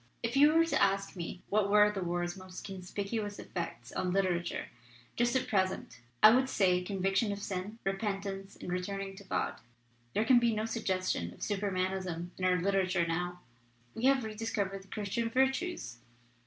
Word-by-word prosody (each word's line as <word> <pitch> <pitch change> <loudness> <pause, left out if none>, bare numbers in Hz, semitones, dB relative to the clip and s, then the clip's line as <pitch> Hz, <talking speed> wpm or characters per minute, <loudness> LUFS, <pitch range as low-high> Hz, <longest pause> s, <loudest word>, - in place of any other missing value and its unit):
4 230 - 0
'If - - -5
you 295 +3 +6
were 330 0 +6
to 330 - +1
ask 195 0 +2
me 180 +1 -6
what 205 -1 +2
were 210 0 +6
the 200 -2 -4
war's 175 0 -1
most 185 -1 -9
conspicuous 200 +2 -4
effects 125 -9 -6
on 180 - -1
literature 180 -2 0 0.5
just 240 +1 +2
at 260 - +1
present, 190 - -1 0.2
I 215 - +11
would 260 +3 +3
say 180 -5 +3
conviction 195 +3 0
of 200 - -3
sin, 200 +1 -4
repentance 195 -1 -3
and 180 0 -3
turning 195 0 -4
to 200 - -10
God. - - -2 0.5
There 215 - +2
can 250 0 +7
be 235 -2 +2
no 215 +1 -1
suggestion 185 - -1
of - - -20
Supermanism 185 -3 -2
in 185 - -2
our 180 0 +3
literature 185 -1 +2
now. 175 +2 -2 0.5
We 230 - -2
have 270 -2 +4
rediscovered 210 -3 -2
the 195 - -18
Christian 215 +3 -2
Virtues. 265 - 0
195 Hz, 170 wpm, -32 LUFS, 185-215 Hz, 0.5 s, I